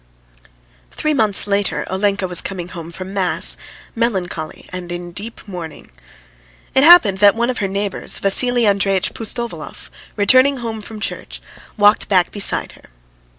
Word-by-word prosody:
Three 305 - -3
months 215 -7 +3
later 200 -1 0
Olenka 195 0 -1
was 180 -1 +2
coming 180 -3 -7
home 170 -2 -9
from 185 +2 -9
mass, 185 -2 +4 0.4
melancholy 190 -9 -4
and 180 -1 -7
in 175 0 -7
deep 215 +5 -9
mourning. 175 -5 -9 0.8
It 265 - +3
happened 285 - +6
that 205 0 +5
one 235 +2 0
of 250 - -6
her 200 - -1
neighbours, 200 0 -2
Vassily 240 +4 +3
Andreitch 195 -2 0
Pustovalov, 235 +1 -7 0.2
returning 260 +6 +3
home 225 -3 -6
from 215 +1 -10
church, - - -5 0.4
walked 205 +1 +3
back 185 -3 +2
beside 205 - +2
her. - - -20
200 Hz, 145 wpm, -17 LUFS, 185-225 Hz, 0.8 s, happened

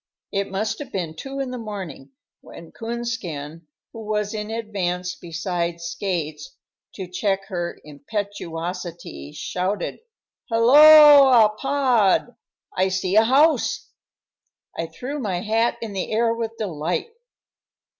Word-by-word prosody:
It 200 0 -2
must 200 +3 -2
have 285 -3 -8
been 170 -4 -4
two 270 +10 -7
in 265 -2 -3
the 250 - -5
morning 195 -11 -7 0.3
when 165 - -13
Coonskin, 180 -10 -5 0.3
who 225 - -8
was 210 -1 -2
in 210 0 -4
advance 185 -5 -3
beside 170 0 -3
Skates 170 -3 -4 0.4
to 190 - -5
check 195 +2 -1
her 175 -3 -4
impetuosity, 170 - -6
shouted, 185 - -3 0.5
"Helloa, 275 -2 +8
Pod, 250 -4 +2 0.4
I 185 +1 +2
see 190 0 -1
a 220 - +7
house!" 290 +6 +2 0.8
I 165 - -3
threw 255 - -6
my 190 -8 -2
hat 225 +3 +1
in 220 -3 -6
the 190 - -4
air 230 +1 +2
with 230 -1 -5
delight. 175 - -3
200 Hz, 120 wpm, -23 LUFS, 175-230 Hz, 0.8 s, Helloa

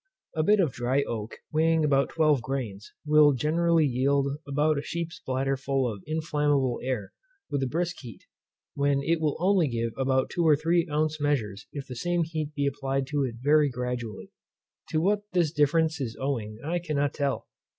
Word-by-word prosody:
A 155 - +2
bit 210 +6 +4
of 165 -8 +2
dry 130 +4 +1
oak, 110 -3 -6
weighing 160 0 +3
about 140 -2 +2
twelve 155 -5 +2
grains, 115 -5 -5
will 150 -1 +6
generally 165 +4 +2
yield 140 +2 +2 0.2
about 150 +1 +1
a - - -3
sheep's 170 +2 -5
bladder 135 +1 0
full 135 -1 0
of 105 -4 -5
inflammable 150 -5 0
air 125 -6 -3 0.4
with 140 - 0
a 135 - 0
brisk 175 +5 -2
heat, 120 -6 -11 0.5
when 140 -1 +1
it 165 +2 +1
will 150 -2 0
only 185 -2 +3
give 115 -2 -2
about 130 0 +1
two 175 - 0
or 155 -2 +6
three 165 +3 +1
ounce 155 0 0
measures, 115 -8 -1
if 140 -2 -6
the 125 - -8
same 175 +7 0
heat 155 -2 -4
be 145 - 0
applied 135 -1 -1
to 145 -1 0
it 125 -3 -3
very 150 0 +4
gradually. 125 -3 -5 0.6
To 155 - +1
what 200 +5 +2
this 170 -5 +2
difference 160 +1 +2
is 115 -4 -4
owing, 115 -6 -3
I 175 +3 0
cannot 145 -4 -1
tell. 140 -2 -1
145 Hz, 180 wpm, -27 LUFS, 130-155 Hz, 0.6 s, will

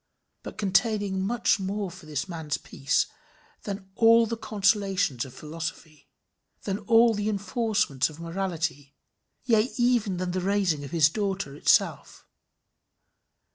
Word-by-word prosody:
but - - -9
containing 205 -1 +1 0.4
more 195 0 -3
for 180 -3 -13
this 150 +3 -3
man's 160 -5 -3
peace 140 0 0 0.6
than 200 -1 -5
all 230 +2 +5
the 230 +1 -3
consolations 195 - 0
of 130 - -11
philosophy, 155 0 -7 0.6
than 195 0 -2
all 230 0 +4
the 205 0 -1
enforcements 205 - 0
of 155 0 -13
morality; 165 -5 -3 0.5
yea, 230 -1 +2
even 240 -6 +2
than 180 0 -2
the 185 +1 -2
raising 190 -6 0
of 140 - -7
his 165 -3 +4
daughter 195 -5 -3
itself. - - +1
195 Hz, 125 wpm, -26 LUFS, 160-210 Hz, 0.6 s, all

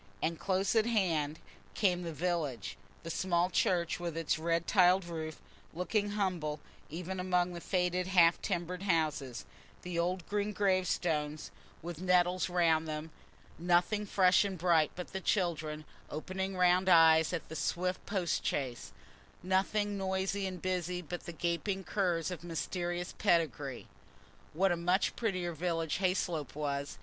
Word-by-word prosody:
And 165 +6 -1
close 190 +2 0
at 220 0 +4
hand 165 -9 +1 0.4
came 180 -4 +2
the 170 -1 -4
village: 145 - -2 0.3
the 165 - -5
small 175 +1 +1
church, 175 -1 +1
with 170 -2 -4
its 165 -1 0
red 165 +1 0
tiled 185 -1 +4
roof, 160 -2 -5 0.4
looking 205 +4 -1
humble 175 -7 -1 0.3
even 180 +4 -5
among 180 -1 +1
the 170 - -7
faded 180 0 0
half 175 -3 +5
timbered 180 -1 -3
houses; 155 - -1 0.4
the 180 -1 -3
old 180 0 -1
green 210 0 -1
gravestones 175 -6 0 0.3
with 170 -1 -6
nettles 180 0 +2
round 165 -3 +2
them; 155 +1 -5 0.5
nothing 180 +5 +2
fresh 185 -1 +4
and 195 -2 -3
bright 165 -3 +3
but 180 +1 -7
the 190 - -3
children, 160 -6 -1 0.2
opening 190 +5 -4
round 180 +1 +4
eyes 160 -2 +6
at 175 -3 -4
the 160 - -8
swift 180 +3 -1
post 185 -5 -1
chaise; 130 -4 -3 0.5
nothing 200 +2 +1
noisy 190 +1 -1
and 185 -2 -7
busy 180 -1 -2
but 175 +2 -7
the - - -4
gaping 175 +4 -2
curs 180 -4 0
of 170 -3 -6
mysterious 175 +1 -3
pedigree. 150 - 0 0.7
What 190 +4 +2
a - - +2
much 180 +3 +1
prettier 185 -6 -1
village 165 0 -1
Hayslope 180 -6 -1
was! 140 -1 -3
175 Hz, 145 wpm, -32 LUFS, 165-185 Hz, 0.7 s, eyes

